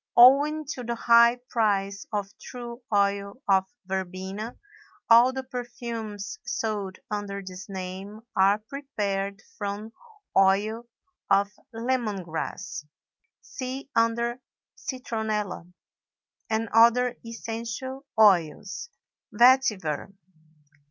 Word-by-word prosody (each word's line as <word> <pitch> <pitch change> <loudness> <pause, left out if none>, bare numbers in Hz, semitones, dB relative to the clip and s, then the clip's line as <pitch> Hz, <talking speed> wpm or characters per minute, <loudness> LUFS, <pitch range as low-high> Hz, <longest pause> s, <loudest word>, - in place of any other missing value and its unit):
Owing 285 +5 +7
to 250 - -7
the 235 0 -2
high 235 +1 +6
price 200 -4 0
of 205 -2 -1
true 240 0 -8
oil 200 -1 +1
of 190 -1 +4 0.2
verbena, 190 +4 -4 0.5
all 235 +3 +8
the 265 0 -4
perfumes 235 -4 -6
sold 215 -5 -3
under 200 -1 -3
this 185 +1 -9
name 190 +2 -6
are 195 +2 +5
prepared 210 -5 -3 0.2
from 205 +2 -4 0.4
oil 205 +4 +3 0.4
of 200 +1 +4 0.2
lemon 230 -4 -1
grass 165 +1 -5 0.6
(see 265 +1 -6
under 235 +2 +1 0.4
Citronella) 215 -8 -3 0.8
and 225 +1 0
other 235 +2 +5
essential 230 +4 -6
oils. 205 - +3 0.4
VETIVER. 210 - +3
220 Hz, 90 wpm, -27 LUFS, 200-240 Hz, 0.8 s, all